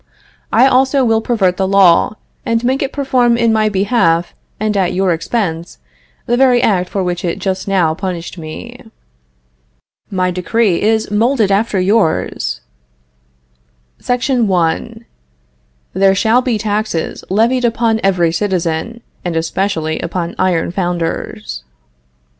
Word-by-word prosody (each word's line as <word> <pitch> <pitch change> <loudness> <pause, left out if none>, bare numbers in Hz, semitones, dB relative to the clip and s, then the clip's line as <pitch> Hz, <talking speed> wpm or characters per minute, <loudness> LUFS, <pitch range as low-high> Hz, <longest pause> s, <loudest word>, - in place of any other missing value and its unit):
I - - +5
also 265 0 +3
will 225 -1 +2
pervert 195 -6 0
the 190 - 0
law, 195 0 +4 0.3
and 230 0 -1
make 260 +2 0
it 270 - -2
perform 255 -4 +1
in 230 -1 +2
my 215 -1 +2
behalf 190 -4 +1 0.3
and 215 0 -1
at 190 -3 +1
your 190 -1 +2
expense 170 -1 -3 0.5
the 240 - +1
very 250 -1 +4
act 185 -6 +1
for 195 - -2
which 175 -1 -3
it 170 -2 -2
just 190 0 -3
now 180 -5 +2
punished 175 -1 -5
me. 155 -3 -9 1.3
My 185 -1 0
decree 185 +2 0
is 220 0 +1
modeled 220 0 +2
after 200 0 +1
yours: 195 -2 0 1.4
SECTION 245 -1 0
1. 195 +6 -1 0.9
There 195 +1 +3
shall 225 +5 +3
be 245 -3 -1
taxes 210 -5 -2
levied 230 +6 +2
upon 230 -1 +1
every 180 -4 +2
citizen, 180 +3 -2 0.2
and 175 -2 -3
especially 165 -1 -1
upon 170 0 -3
iron 180 -3 +1
founders. 170 - -3
195 Hz, 130 wpm, -15 LUFS, 175-230 Hz, 1.4 s, I